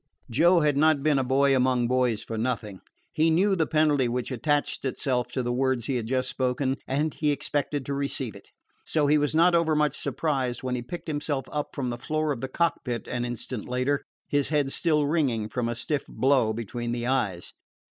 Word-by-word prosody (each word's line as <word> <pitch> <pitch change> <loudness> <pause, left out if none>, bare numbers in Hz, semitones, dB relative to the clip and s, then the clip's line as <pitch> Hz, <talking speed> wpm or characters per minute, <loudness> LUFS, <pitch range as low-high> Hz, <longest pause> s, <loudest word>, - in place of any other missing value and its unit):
Joe 170 +8 +5
had 150 -2 +2
not 155 -1 +3
been 150 -3 +3
a - - +1
boy 135 +2 +3
among 125 -2 +2
boys 125 -3 +1
for 115 - -5
nothing. 110 -4 -3 0.3
He 160 +1 +3
knew 190 +5 +3
the 160 -4 +1
penalty 150 -4 +3
which 125 +2 -2
attached 145 +4 0
itself 130 -2 -1
to 130 - -1
the 120 0 -1
words 130 -2 0
he 135 - -1
had 115 -2 -4
just 130 +1 0
spoken, 130 +1 -1
and 145 +3 0
he 150 - 0
expected 145 -1 -1
to 140 - -3
receive 140 -4 -3
it. - - -14 0.3
So 155 -2 +1
he 150 +1 +4
was 145 +1 0
not 170 +2 +5
overmuch 155 -4 +2
surprised 130 -6 -2
when 130 -1 -2
he 125 - -2
picked 170 +10 -8
himself 145 -3 -2
up 150 -1 -4
from 130 -3 -2
the 120 - -5
floor 155 +3 -1
of 125 -5 -3
the 130 - -2
cockpit 130 -7 -1
an 120 0 -2
instant 120 -1 -5
later, 130 +3 0 0.3
his 145 -2 0
head 145 -3 +1
still 150 -2 +2
ringing 135 -9 0
from 120 0 -2
a 120 - -2
stiff 135 +4 -2
blow 130 -4 +2
between 115 +2 -4
the 120 0 -3
eyes. 105 -9 -1
135 Hz, 205 wpm, -26 LUFS, 125-150 Hz, 0.3 s, Joe